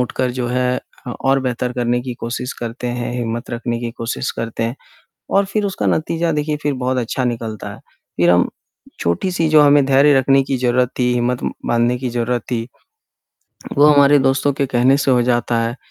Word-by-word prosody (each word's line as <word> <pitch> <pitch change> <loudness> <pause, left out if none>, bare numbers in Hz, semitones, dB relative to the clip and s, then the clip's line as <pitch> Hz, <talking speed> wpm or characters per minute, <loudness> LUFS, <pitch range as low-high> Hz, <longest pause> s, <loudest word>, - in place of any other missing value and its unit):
उठकर 125 +1 -1
जो 125 0 -3
है 125 0 0 0.4
और 135 0 +2
अ, - - -3
बेहतर 125 -1 -2
करने 120 -1 0
की 125 -1 -5
कोशिश 125 +2 -4
करते 120 +1 -5
हैं, 120 0 -3
हिम्मत 120 -1 -4
रखने 120 0 -3
की 120 -1 -3
कोशिश 115 +2 -4
करते 115 0 -4
हैं 115 +4 -2 0.6
और 195 0 +4
फिर 205 +1 -1
उसका 195 - -3
नतीजा 165 +1 0
देखिए 150 0 -1
फिर 145 -1 0
बहुत 130 0 -2
अच्छा 125 +2 -2
निकलता 115 -3 -4
है, - - -13 0.4
फिर 85 0 +3
हम 90 0 +3 0.5
छोटी-सी 165 - 0
जो 155 -1 +6
हमें 145 -1 +5
धैर्य 140 +2 +5
रखने 135 +1 +3
की 135 -1 -2
ज़रूरत 125 0 +1
थी, 125 0 +2
हिम्मत 125 0 0
म - - -1
बाँधने 120 +1 +1
की 125 0 -3
ज़रूरत 120 0 -1
थी, 115 0 -2 1.1
वो 145 - +6
हमारे 145 -1 +6
दोस्तों 135 +1 +2
के 140 +1 -1
कहने 130 +1 +3
से 140 - +1
हो 125 -1 +4
जाता 120 -1 +1
है 115 +2 -2
125 Hz, 195 wpm, -18 LUFS, 120-135 Hz, 1.1 s, जो